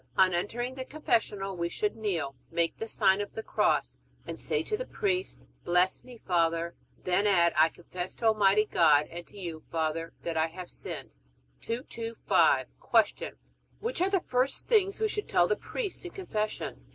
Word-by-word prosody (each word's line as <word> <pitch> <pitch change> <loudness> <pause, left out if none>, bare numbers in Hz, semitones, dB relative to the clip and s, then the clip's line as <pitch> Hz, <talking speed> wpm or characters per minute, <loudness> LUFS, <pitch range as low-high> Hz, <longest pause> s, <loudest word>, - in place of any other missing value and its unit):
On 185 -1 +5
entering 240 +8 -2
the 260 0 -5
confessional 220 -9 -1
we 170 -1 -2
should 420 - -1
kneel, 175 -11 -1 0.2
make 170 -1 0
the 225 - -5
sign 200 -3 +3
of 205 - -6
the 220 - -5
Cross, - - +1 0.3
and - - -5
say - - 0
to 430 - -1
the - - -5
priest, 380 -3 -1 0.2
Bless 180 +2 +2
me, 250 -2 -12
Father; 170 -3 +1 0.3
then 185 +3 +2
add, 170 -4 +4
I 160 +1 +6
confess 175 +2 -7
to 230 - -5
Almighty 210 -1 +4
God 150 -7 +4
and 170 +1 -7
to - - -15
you, 170 -5 -5
Father, 165 0 -1
that 165 -1 -2
I 160 +1 +3
have 180 +2 -9
sinned. - - -6 0.5
225. 230 - +1 0.5
Q. - - -5 0.5
Which 470 -4 -2
are 375 - +3
the 390 -1 +3
first 255 -1 0
things 405 -4 +3
we 440 - +2
should 420 0 -3
tell 175 - +4
the 210 - +2
priest 420 - -4
in 355 - -6
Confession? 215 - -4
205 Hz, 175 wpm, -29 LUFS, 170-255 Hz, 0.5 s, I